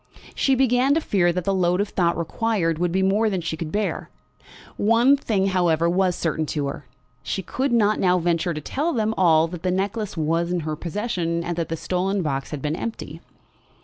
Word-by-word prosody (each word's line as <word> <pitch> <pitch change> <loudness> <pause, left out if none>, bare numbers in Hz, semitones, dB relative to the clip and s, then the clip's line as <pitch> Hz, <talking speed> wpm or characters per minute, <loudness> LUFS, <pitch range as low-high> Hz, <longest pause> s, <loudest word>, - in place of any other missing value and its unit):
She 270 - +2
began 260 +2 +3
to - - +3
fear 185 - +1
that 180 +1 -2
the 195 - 0
load 180 -1 +1
of 205 0 0
thought 170 -2 +1
required 170 -1 -1
would 175 -1 0
be 190 +2 +1
more 210 +4 +2
than 190 -3 -1
she 165 -1 -3
could 160 -1 -6
bear. 210 0 -2 0.7
One 230 +6 +4
thing, 205 -8 0
however, 170 -3 +2
was 180 +1 +1
certain 160 -2 -2
to 145 -1 -2
her; 140 -1 -6 0.3
she 190 - -3
could 265 +9 -2
not 215 -3 +3
now 180 -1 +3
venture 170 -1 0
to 155 - -4
tell 300 - -2
them 220 -3 0
all 165 -3 +4
that 175 -1 -7
the 185 - -1
necklace 200 +2 -2
was 165 +2 0
in 180 -1 0
her 155 0 -3
possession, 170 -1 -2
and 175 0 -3
that 170 -1 -3
the 165 - -3
stolen 185 +4 -1
box 135 -3 -2
had 145 -3 -6
been 150 +1 -1
empty. 225 +5 -6
180 Hz, 210 wpm, -23 LUFS, 165-210 Hz, 0.7 s, One